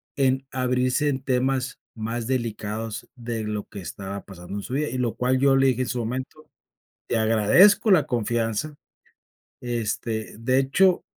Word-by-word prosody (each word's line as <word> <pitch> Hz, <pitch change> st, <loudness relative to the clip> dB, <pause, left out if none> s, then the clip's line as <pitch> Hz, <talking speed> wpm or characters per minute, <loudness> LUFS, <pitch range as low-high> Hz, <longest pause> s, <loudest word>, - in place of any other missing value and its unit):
en 135 Hz, -1 st, +1 dB
abrirse 125 Hz, +3 st, +1 dB
en 130 Hz, -1 st, -2 dB
temas 130 Hz, 0 st, 0 dB
más 115 Hz, +1 st, -4 dB
delicados 115 Hz, -2 st, -3 dB
de 115 Hz, -2 st, -4 dB
lo 105 Hz, -1 st, -3 dB
que 100 Hz, -, -9 dB
estaba 100 Hz, +2 st, -6 dB
pasando 90 Hz, -1 st, -9 dB
en 100 Hz, -, -4 dB
su 125 Hz, -, -6 dB
vida. 150 Hz, +2 st, 0 dB
Y 130 Hz, -, -4 dB
lo 120 Hz, -3 st, -1 dB
cual 130 Hz, +1 st, +1 dB
yo 135 Hz, 0 st, +4 dB
le 135 Hz, 0 st, +4 dB
dije 130 Hz, -1 st, +1 dB
en -, -, -4 dB
su 125 Hz, -, -2 dB
momento: 130 Hz, +6 st, -5 dB, 0.6 s
"Te -, -, 0 dB
agradezco 115 Hz, -, +5 dB
la 165 Hz, -7 st, +5 dB
confianza", 120 Hz, +4 st, -1 dB, 0.9 s
este, 115 Hz, -2 st, -3 dB
de 130 Hz, +3 st, +1 dB
hecho, 180 Hz, +7 st, +3 dB
125 Hz, 160 wpm, -24 LUFS, 110-135 Hz, 0.9 s, agradezco